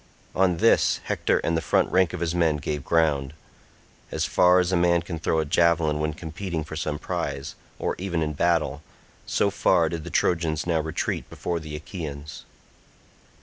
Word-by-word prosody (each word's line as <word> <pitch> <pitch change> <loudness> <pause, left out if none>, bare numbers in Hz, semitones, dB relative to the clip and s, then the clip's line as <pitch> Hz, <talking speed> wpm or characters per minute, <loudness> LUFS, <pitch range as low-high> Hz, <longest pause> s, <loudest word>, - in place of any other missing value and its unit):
On 90 -2 +2
this - - +3
Hector - - +1
and 85 - +1
the 80 - 0
front 75 - +1
rank 95 -2 +3
of 90 - -6
his 85 -1 0
men 85 -3 +2
gave 75 0 -4
ground. 75 -4 +1 0.8
As - - -1
far 90 0 +4
as 90 0 +2
a - - +2
man 85 -1 +3
can 85 -1 -5
throw 80 - 0
a 80 - +1
javelin 80 -1 +2
when 75 0 -1
competing 80 +1 -4
for 80 - -8
some 75 -2 -2
prize, 70 +1 -4 0.2
or - - -1
even 90 -4 -1
in 75 -1 -2
battle—so 75 -3 -1
far - - +3
did 80 -2 -4
the - - -7
Trojans 80 -3 0
now 85 -2 +1
retreat 80 0 -3
before 85 -1 -3
the 75 -1 -7
Achaeans. 75 -2 -7
80 Hz, 175 wpm, -25 LUFS, 75-85 Hz, 0.8 s, far